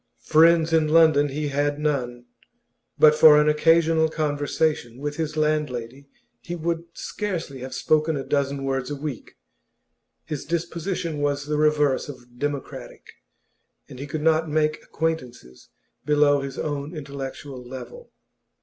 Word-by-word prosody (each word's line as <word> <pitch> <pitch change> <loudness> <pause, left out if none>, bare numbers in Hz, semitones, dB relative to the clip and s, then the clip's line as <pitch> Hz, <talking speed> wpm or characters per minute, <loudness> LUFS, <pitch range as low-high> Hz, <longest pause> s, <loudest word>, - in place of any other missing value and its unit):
Friends 165 +1 +4
in 160 -1 +3
London 155 -2 +4
he 145 +2 -3
had 145 +1 0
none; 125 -5 -2 0.7
but 155 -1 +7
for 150 -1 +7
an 150 - +3
occasional 160 +1 +3
conversation 145 -4 -1
with 145 +2 -5
his 155 -1 -3
landlady 140 -4 -2 0.3
he 175 - -6
would 170 0 -2
scarcely 175 -10 -5
have 130 +1 -7
spoken 155 0 +1
a 135 - -4
dozen 140 -1 -1
words 135 -1 -2
in 145 - -4
a - - -15
week. 145 -5 -7 0.9
His 150 -3 -5
disposition 170 -1 -3
was 145 -1 -1
the 150 0 -2
reverse 150 -2 +2
of 125 -3 -12
democratic, 145 -1 -6 0.8
and 125 - -11
he 140 - -6
could 150 +2 -4
not 160 0 +2
make 155 0 0
acquaintances 125 - -5 0.3
below 145 0 +3
his 135 -1 -6
own 145 +2 -4
intellectual 140 -2 -7
level. 130 - -10
150 Hz, 140 wpm, -24 LUFS, 140-160 Hz, 0.9 s, but